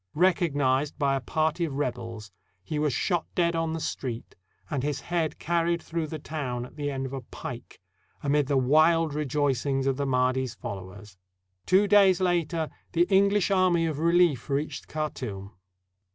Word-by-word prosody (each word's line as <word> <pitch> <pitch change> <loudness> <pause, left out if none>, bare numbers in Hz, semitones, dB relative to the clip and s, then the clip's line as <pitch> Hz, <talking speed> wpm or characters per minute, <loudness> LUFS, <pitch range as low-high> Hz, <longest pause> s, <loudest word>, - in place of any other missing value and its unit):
Recognized 150 -5 +2
by 140 -2 +2
a - - 0
party 155 +4 0
of 150 -5 -2
rebels, 115 -6 -4 0.3
he 150 +8 -3
was 150 -1 +1
shot 175 - 0
dead 170 -1 +2
on 165 -1 -1
the 165 - -3
street 125 -6 -5 0.3
and 140 -4 -2
his 140 -1 -2
head 170 -1 -1
carried 170 0 0
through 165 -1 -3
the 155 - -5
town 135 -5 -4
at - - -15
the 145 -1 -2
end 135 -1 -3
of 130 - -6
a 135 - -4
pike, 115 - -9 0.4
amid 145 0 +2
the 140 -1 +2
wild 155 +4 +4
rejoicings 140 -2 0
of 135 -1 +1
the 140 -1 -1
Mahdi's 130 -1 +1
followers. 95 0 -8 0.5
Two 195 +3 +4
days 195 -2 +5
later 170 -3 0 0.2
the 170 0 +4
English 200 0 +3
army 185 -3 +3
of 155 -3 -2
relief 170 -6 +3
reached 140 +2 -2
Khartoum. 125 -10 -5
150 Hz, 165 wpm, -27 LUFS, 130-170 Hz, 0.5 s, days